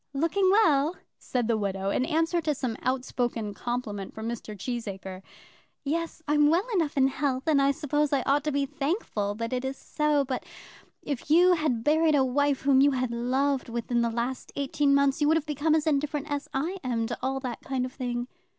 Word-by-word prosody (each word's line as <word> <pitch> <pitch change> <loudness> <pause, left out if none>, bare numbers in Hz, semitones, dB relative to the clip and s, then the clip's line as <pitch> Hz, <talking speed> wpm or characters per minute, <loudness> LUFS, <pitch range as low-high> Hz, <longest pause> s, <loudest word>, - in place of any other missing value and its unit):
"Looking 335 +6 +2
well," 330 -6 +4 0.2
said 245 -3 -2
the 230 -2 +1
widow, 195 -1 -1
in 255 - +1
answer 330 +2 +1
to 300 -2 0
some 250 -4 -3
outspoken 245 -4 -2
compliment 210 -3 -4
from 220 +1 -5
Mr. 220 -3 -6
Cheesacre. 195 -4 -5 0.6
"Yes, 320 +2 -3
I'm 295 0 +4
well 345 +5 +2
enough 325 -7 0
in 265 -1 +5
health, 270 -1 -1
and 300 -4 +3
I 275 - +4
suppose 295 0 0
I 275 -3 +1
ought 285 +2 +2
to 300 - +1
be 280 0 +1
thankful 275 - -2
that 230 +2 -4
it 250 0 -1
is 265 0 -3
so. 300 -2 0
But 260 -1 -3 0.6
if 280 -1 -4
you 355 +4 +6
had 300 -9 0
buried 310 +2 +3
a 270 -2 +4
wife 285 +1 +1
whom 270 -1 +4
you 285 - +6
had 255 -3 -1
loved 260 +3 0
within 235 +1 -1
the 235 - +1
last 240 +3 -3
eighteen 280 0 +1
months, 280 +1 +2
you 295 - +4
would 320 +1 +4
have 315 - -3
become 305 +1 +1
as 310 - +1
indifferent 295 0 -1
as 285 0 -2
I 320 +8 -2
am 235 -3 -1
to 235 0 -4
all 265 +1 -1
that 250 -3 -5
kind 260 -2 -2
of 255 - -7
thing." 245 -2 -3
275 Hz, 205 wpm, -27 LUFS, 240-300 Hz, 0.6 s, you